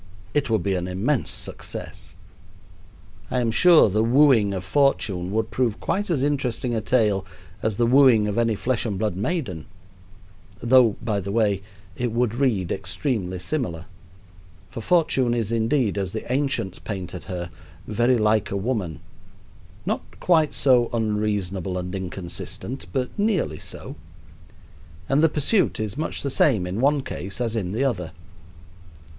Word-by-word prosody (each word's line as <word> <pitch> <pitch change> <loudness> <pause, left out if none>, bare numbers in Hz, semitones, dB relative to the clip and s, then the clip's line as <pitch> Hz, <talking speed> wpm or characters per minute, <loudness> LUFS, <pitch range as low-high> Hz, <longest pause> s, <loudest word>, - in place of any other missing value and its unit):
It 145 -3 +1
would 110 -5 +1
be 100 - 0
an 90 -1 -2
immense 105 +9 0
success. - - -6 1.1
I 125 - 0
am 115 -2 +1
sure 170 +6 +6
the 105 +2 +1
wooing 120 -4 +4
of 95 -2 -3
Fortune 95 -7 +1
would 110 +2 -1
prove 115 -1 0
quite 205 +1 -1
as 145 -6 +1
interesting 130 -4 -1
a 110 - 0
tale 105 -4 +2 0.4
as 110 -2 -1
the 120 - +3
wooing 125 -4 +5
of 105 - -2
any 115 -2 +2
flesh 125 +3 -1
and 105 -5 -2
blood 105 -3 -1
maiden, 105 - -3 0.9
though, 120 -3 +5
by 110 -3 0
the 100 +1 -5
way, 105 -3 +1 0.3
it 120 +2 -2
would 115 -1 0
read 115 -9 0
extremely 95 0 -2
similar; 90 - -3 0.9
for 115 - -6
Fortune 135 -5 +2
is, 115 -2 -2
indeed, 115 -2 +1
as 95 -2 -3
the 110 +2 -5
ancients 135 -9 -1
painted 95 -4 -6
her, 85 -2 -5 0.3
very 120 +4 +2
like 110 -1 +2
a 100 - -2
woman 95 - -2 0.8
not - - -4
quite 160 -4 +3
so 125 -3 +4
unreasonable 105 -5 -1
and 90 +1 -4
inconsistent, 95 +6 -4
but 130 -2 -1
nearly 200 - 0
so - - -8 1.1
and 135 +3 +3
the 160 - +5
pursuit 155 - +1
is 110 -1 -3
much 155 +3 -3
the 140 - -1
same 115 -9 +3
in 95 +6 -3
one 140 0 +3
case 100 -2 -6
as 115 -2 -1
in 95 -5 -2
the 115 +7 -1
other. 90 -12 -2
110 Hz, 150 wpm, -24 LUFS, 95-130 Hz, 1.1 s, sure